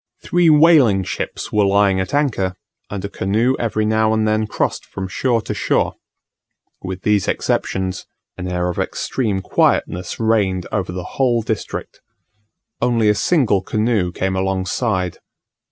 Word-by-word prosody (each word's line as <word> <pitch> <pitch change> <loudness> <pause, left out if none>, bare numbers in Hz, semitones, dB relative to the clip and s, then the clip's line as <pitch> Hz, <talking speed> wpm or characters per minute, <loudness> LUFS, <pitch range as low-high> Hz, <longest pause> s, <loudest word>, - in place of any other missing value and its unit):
Three 175 -1 +3
whaling 150 - +5
ships - - -5
were 105 -1 +3
lying 100 -1 +3
at 95 +2 -3
anchor, 110 -11 0 0.3
and 100 -1 -5
a - - -1
canoe 110 +7 0
every 110 -2 0
now 110 0 +2
and 110 0 +1
then 110 0 +1
crossed - - -2
from 95 -1 -6
shore 115 +4 0
to - - -3
shore; - - 0 0.9
with 95 0 -6
these 105 -3 +2
exceptions, 95 -1 -1 0.3
an 90 - -5
air 90 0 -1
of 90 - -4
extreme 105 -7 -2
quietness 90 0 0
reigned 100 -5 +1
over 95 -4 -2
the 90 0 -5 0.2
whole 120 -3 +2
district. 110 -2 -5 0.8
Only 115 -3 +2
a - - +5
single 105 - +2
canoe 105 -2 0
came 95 +2 -2
alongside. 95 0 -1
105 Hz, 145 wpm, -19 LUFS, 95-115 Hz, 0.9 s, whaling